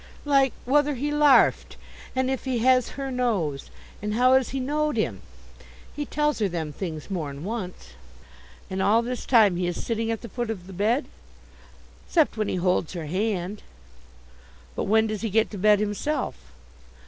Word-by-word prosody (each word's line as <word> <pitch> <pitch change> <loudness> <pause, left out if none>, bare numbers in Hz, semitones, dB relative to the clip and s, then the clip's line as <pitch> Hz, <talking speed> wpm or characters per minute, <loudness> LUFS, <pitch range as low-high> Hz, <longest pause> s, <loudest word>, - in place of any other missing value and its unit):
"Like 275 -2 +3
whether 290 +2 +2
he 290 +4 -2
larfed, 295 -1 +4 0.4
and 260 0 +1
if 265 - -3
he 260 -2 0
has 255 +1 +3
her 270 -1 -3
nose, 200 - -1 0.3
and 210 +1 -2
how 250 +2 +5
as 265 -1 +3
he 270 - -3
knowed 300 +3 -1
him. - - -1 0.7
He 295 -1 -4
tells 300 -2 0
her 205 -3 +1
them 160 -4 -4
things 160 0 -6
more'n 150 -5 -4
once." 190 - -5 0.8
"And 190 0 -3
all 215 +4 +3
this 250 +1 -5
time 215 -8 +5
he 180 0 -1
is 175 - -4
sitting 225 -1 -1
at 225 -1 -2
the 235 - -7
foot 240 +1 -4
of 195 -5 -5
the 190 - -10
bed?" 220 - +1 1.0
"'Cept 320 -4 +3
when 215 -2 -1
he - - -1
holds 180 -2 0
her 170 -3 -5
hand." 190 +3 -2 1.1
"But - - -2
when 220 +2 +3
does 215 -2 -3
he 225 - -1
get 220 +2 +2
to 205 - -6
bed 210 +1 +5
himself?" 210 +9 -2
225 Hz, 175 wpm, -25 LUFS, 190-260 Hz, 1.1 s, how